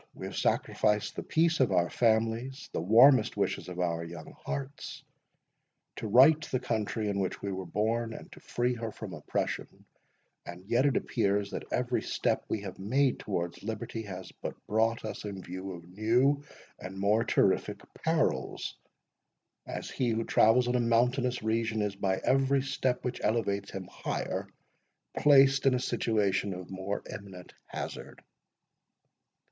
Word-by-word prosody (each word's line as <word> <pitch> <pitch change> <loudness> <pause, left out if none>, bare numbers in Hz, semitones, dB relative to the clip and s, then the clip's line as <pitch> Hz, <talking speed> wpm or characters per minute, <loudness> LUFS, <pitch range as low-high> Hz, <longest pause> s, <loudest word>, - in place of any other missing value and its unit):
We - - -7
have - - -6
sacrificed 105 -1 +1
the - - -3
peace 165 +1 +2
of 130 -6 +3
our 90 -2 +3
families, 115 +5 0
the - - -1
warmest 115 - +6
wishes - - -1
of 90 0 -7
our 85 -2 0
young 85 -1 -9
hearts, 140 +1 -6 0.9
to - - -4
right 135 +8 +7
the 130 - -1
country 110 -1 -2
in 100 -1 -1
which 95 -2 -2
we 100 - -2
were 95 -1 -5
born, 115 +4 0
and - - -10
to - - -12
free 120 +1 -1
her 115 -2 -4
from - - -8
oppression; - - -4 0.8
yet 120 +6 +3
it 140 - +2
appears, 100 -3 0
that - - -6
every 125 0 0
step - - 0
we 110 - -1
have 95 -2 -8
made 130 +7 +1
towards 85 -4 -3
liberty, 110 +1 -4
has 95 -3 -8
but - - -4
brought 110 +1 +1
us 110 - -5
in 100 -3 -6
view 95 +2 -6
of 85 -1 -9
new 120 +9 +2 0.4
and 95 +1 -8
more 105 +3 +3
terrific - - +2 0.2
perils, - - -1 0.9
as - - -5
he 125 -2 0
who 115 0 0
travels 115 +3 +4
in 125 - +1
a 125 - +2
mountainous 120 +1 +2
region, 110 -1 0
is 100 -1 -2
by 95 -1 0
every 135 0 +3
step 130 -2 -1
which 125 - -3
elevates 100 -3 0
him 95 -1 -6
higher, - - -3 0.7
placed 135 -2 +6
in 130 - +5
a - - +1
situation 100 -6 0
of 90 0 -9
more 95 +2 -3
imminent 95 -3 -10
hazard." - - -7
110 Hz, 155 wpm, -30 LUFS, 100-125 Hz, 0.9 s, right